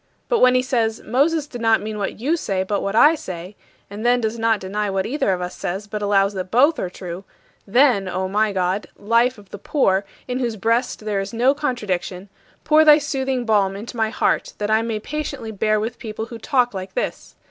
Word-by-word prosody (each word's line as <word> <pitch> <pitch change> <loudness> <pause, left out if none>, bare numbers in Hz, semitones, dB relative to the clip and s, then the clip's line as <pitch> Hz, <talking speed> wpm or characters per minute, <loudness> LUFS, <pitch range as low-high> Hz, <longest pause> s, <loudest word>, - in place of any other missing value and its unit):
But 480 - +2
when 255 0 +5
he 255 - +3
says, 230 -4 -1
"Moses 290 +6 +1
did 245 -5 -9
not 225 -1 +4
mean 215 0 -5
what 200 - -3
you 290 +8 +1
say, 195 - -1
but 200 +1 -2
what 200 +1 -2
I 295 +7 +7
say," 185 - -7 0.3
and 205 +2 -8
then 245 +1 +3
does 225 0 -2
not 225 -1 +2
deny 205 +2 -2
what 195 -1 -1
either 255 -5 0
of 180 -1 -1
us 180 0 -5
says 190 +4 -4
but 210 0 -5
allows 200 -1 +2
that 185 -1 -5
both 280 - +4
are 180 - -2
true 180 0 -8 0.4
then, 240 -3 +3
O 185 +1 -2
my 210 +2 +1
God, 185 +1 -1
life 230 +4 +2
of 200 -2 -16
the 205 - -8
poor, 195 -7 +1 0.2
in 250 0 -2
whose 235 -3 -1
breast 230 +4 0
there 205 -2 0
is 195 +2 -5
no 245 +4 +3
contradiction, 205 -9 -3 0.3
pour 310 0 +5
thy 300 -1 +8
soothing 265 -4 -2
balm 200 -3 +2
into 220 +5 -8
my 220 -1 +1
heart - - 0
that 210 0 -2
I 220 +1 +4
may 225 -2 -2
patiently 280 -2 -5
bear 215 +1 +1
with 225 +3 -4
people 220 0 -5
who 230 0 -9
talk 245 -1 +1
like 190 0 -7
this! - - -4
220 Hz, 220 wpm, -21 LUFS, 195-250 Hz, 0.4 s, thy